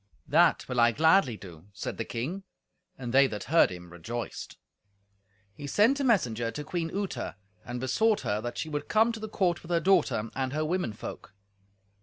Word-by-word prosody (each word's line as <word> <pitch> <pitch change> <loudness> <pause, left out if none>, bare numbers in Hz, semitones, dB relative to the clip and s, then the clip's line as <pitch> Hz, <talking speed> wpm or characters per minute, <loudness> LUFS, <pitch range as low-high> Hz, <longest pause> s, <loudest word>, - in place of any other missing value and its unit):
"That 165 +3 +4
will 125 -1 -1
I 120 0 +6
gladly 160 - +4
do," 90 -2 -12
said - - -5
the 115 - -1
king; 140 +12 -4 0.6
and 125 -4 -5
they 135 +1 +6
that 105 -5 -5
heard 165 +3 +4
him 90 -1 -9
rejoiced. 115 +7 -6 1.0
He 145 +7 -8
sent 225 - +3
a - - 0
messenger 120 - +2
to 150 +5 -5
Queen 165 +2 -3
Uta, 190 - -4 0.3
and 120 0 -5
besought 210 - +2
her 105 +1 -1
that 120 +1 -5
she - - -3
would 150 -1 -4
come 220 +2 +4
to 225 - -6
the 220 0 -6
court 180 -5 0
with 170 - -13
her 170 -1 +2
daughter 145 - +2
and 130 0 -2
her 155 +1 0
women 175 -8 -1
folk. 105 -1 -9
145 Hz, 190 wpm, -28 LUFS, 115-180 Hz, 1.0 s, I